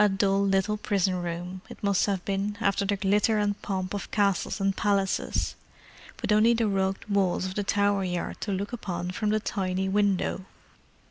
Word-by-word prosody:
A 210 - +5
dull 195 0 +2
little 195 +2 +1
prison 190 -3 0
room, 175 +2 -5
it - - -12
must 200 -1 +2
have 195 -3 -1
been, 200 +1 -1
after 200 -2 +1
the 200 +1 +1
glitter 205 +3 +2
and 205 -1 0
pomp 185 -1 -3
of 200 - -4
castles 200 -1 +1
and 195 0 +1
palaces—with 200 -2 0 0.8
only 220 +3 +5
the 230 -1 +1
rugged 195 0 -1
walls 195 -3 +1
of 185 - -4
the 205 - -1
Tower 200 0 +2
Yard 180 -2 -3
to 205 - -2
look 200 +4 -3
upon 180 -6 -3
from 210 +3 -1
the 215 +1 +2
tiny 190 -2 -2
window. 195 -1 +1
195 Hz, 180 wpm, -27 LUFS, 190-205 Hz, 0.8 s, A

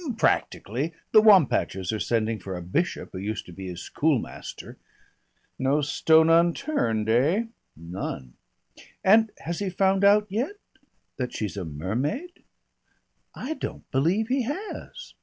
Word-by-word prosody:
"Practically. 140 - 0 0.2
The 215 - +8
Wampachers 125 - +4
are 110 - -2
sending 115 -1 0
for 95 0 -6
a 90 - -5
Bishop 150 - -2
who 95 - -6
used 105 +3 -4
to - - -12
be 95 +2 -8
his 90 -1 -6
schoolmaster 145 -6 -3 0.4
" - - -46 0.3
"No 135 +3 +2
stone 160 +2 +4
unturned, 165 - +2
eh?" 140 - +3 0.3
"None." 85 -7 -6 0.7
"And 220 +3 +5
has 170 0 -4
he 200 -2 -1
found 190 +1 +2
out 205 +1 +6
yet 240 - -2 0.3
" - - -47
"That 125 -2 -3
she's 105 -3 -3
a 95 -3 -4
mermaid? 125 - -3 0.9
I 270 +5 -4
don't - - -7
believe 175 - +1
he 265 +1 +2
has. 300 - -6
150 Hz, 140 wpm, -26 LUFS, -, 0.9 s, The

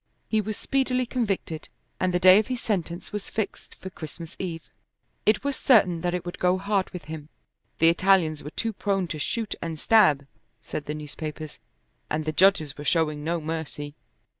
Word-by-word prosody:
He 220 -1 +2
was 215 0 -4
speedily 260 -2 +1
convicted, 200 -10 -2 0.3
and 185 - +1
the 180 - +2
day 185 +2 +8
of 215 - -1
his 255 -1 -2
sentence 175 -6 -3
was 205 -1 -5
fixed 220 -2 -4
for 190 - -9
Christmas 165 +1 -9
Eve. 170 -3 -5 0.6
It 215 +3 +4
was 280 -1 -1
certain 190 -12 +4
that 175 +1 0
it 180 - -4
would 175 - -6
go 180 +1 +3
hard 200 0 0
with 180 - -8
him. 155 -1 -8 0.5
The 165 - +6
Italians 170 -3 +3
were 150 - -6
too 225 +7 -2
prone 195 -2 0
to 155 - -4
shoot 220 +8 -2
and 165 -2 -4
stab, 155 -11 +5 0.3
said 145 - -6
the 150 - -2
newspapers, 155 0 -6 0.5
and 155 0 -1
the 155 - 0
judges 155 -5 +3
were - - -5
showing 150 -2 +1
no 170 +2 0
mercy. 155 -2 -5
175 Hz, 185 wpm, -26 LUFS, 155-205 Hz, 0.6 s, day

